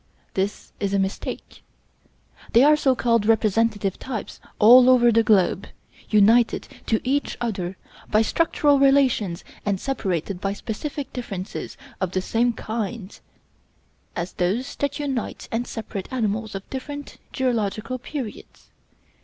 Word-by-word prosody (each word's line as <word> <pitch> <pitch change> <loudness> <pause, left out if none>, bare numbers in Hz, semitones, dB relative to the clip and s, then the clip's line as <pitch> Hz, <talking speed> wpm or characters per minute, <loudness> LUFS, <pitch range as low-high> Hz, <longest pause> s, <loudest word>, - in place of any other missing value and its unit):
This 195 +2 -3
is 200 -1 -1
a - - +3
mistake. 195 0 -4 0.9
They 235 - +7
are 300 +1 +7
so 270 -3 +2
called 230 -3 +1
representative 215 -2 +2
types 240 -6 -6 0.2
all 245 +4 +8
over 240 -2 +6
the 230 0 +4
globe, 205 -2 +2 0.4
united 220 +3 +4 0.2
to 220 - +2
each 285 +2 0
other 190 -6 -3 0.3
by 215 +1 +4
structural 290 +1 +2
relations 265 -10 +3 0.2
and 200 -2 0
separated 190 - -2
by 195 0 -1
specific 275 +7 -5
differences 200 -7 -6 0.2
of 185 -1 -1
the 185 - 0
same 240 +4 +1
kind 220 -2 -5 1.0
as 175 +1 -4
those 210 +10 -1
that 285 -1 -1
unite 275 -5 -3
and 235 +2 -2
separate 205 -4 -6
animals 220 -3 -2
of 195 - -7
different 285 +2 -7
geological 230 -1 -1
periods. 255 -4 -8
225 Hz, 130 wpm, -23 LUFS, 200-255 Hz, 1.0 s, all